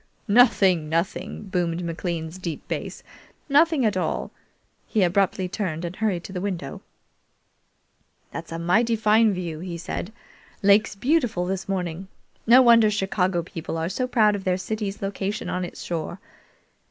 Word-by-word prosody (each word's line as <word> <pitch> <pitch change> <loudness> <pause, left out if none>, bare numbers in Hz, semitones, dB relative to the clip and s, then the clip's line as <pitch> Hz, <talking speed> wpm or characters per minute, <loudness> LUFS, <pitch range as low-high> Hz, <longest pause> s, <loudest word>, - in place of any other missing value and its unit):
"Nothing, 200 -8 +4
nothing!" 170 +6 -2
boomed 175 -3 -2
McLean's 165 0 -4
deep 170 -4 -5
bass; - - -5 0.4
"nothing 300 -1 +4
at 210 - +1
all!" 185 - -2 0.6
He 215 - +2
abruptly 185 +1 +1
turned, 175 -4 -3
and 170 +2 -5
hurried 195 -5 -1
to 190 - -9
the 180 - -3
window. 180 -8 -4 1.5
"This 165 - -5
is - - -17
a - - -3
mighty 220 +8 +2
fine 220 0 +4
view," 175 -5 -4
he 175 0 -5
said. 175 +3 -5 0.5
"Lake's 205 +2 +4
beautiful 240 - +1
this 190 +1 -3
morning. 180 -1 -3 0.4
No 250 +3 +8
wonder 230 -3 +6
Chicago 190 -3 0
people 165 -2 -6
are 165 +1 -1
so 255 +6 -2
proud 215 -4 +3
of 195 - -5
their 185 -1 +1
city's 205 +1 -4
location 195 +1 -3
on 180 - -2
its 175 - -7
shore. 175 +2 -4
190 Hz, 155 wpm, -24 LUFS, 175-215 Hz, 1.5 s, No